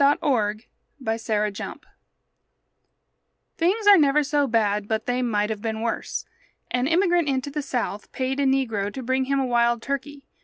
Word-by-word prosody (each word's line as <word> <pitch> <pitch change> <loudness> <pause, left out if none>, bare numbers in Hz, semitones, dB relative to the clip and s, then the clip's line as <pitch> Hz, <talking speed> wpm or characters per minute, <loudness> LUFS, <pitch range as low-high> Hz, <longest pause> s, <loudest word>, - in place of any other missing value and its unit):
A 285 +1 +5
POOR 220 -8 +1 0.5
UNFORTUNATE 215 -2 -2 1.7
Things 385 +6 +1
are 405 -3 +8
never 295 0 +4
so 290 0 +1
bad 210 -3 +1
but 220 0 -1
they 250 +1 0
might 210 -3 0
have 210 -2 -4
been 220 -1 -3
worse. 230 0 -3 0.5
An 250 +1 +1
immigrant 345 -1 +2
into 270 +1 -1
the 295 +1 -2
South 245 -7 -3
paid 265 +1 -2
a 280 - +2
negro 225 -7 0
to 265 - -5
bring 260 +2 0
him 275 +1 +1
a 265 - +1
wild 235 -1 +2
turkey. 280 0 -4
255 Hz, 160 wpm, -24 LUFS, 225-285 Hz, 1.7 s, are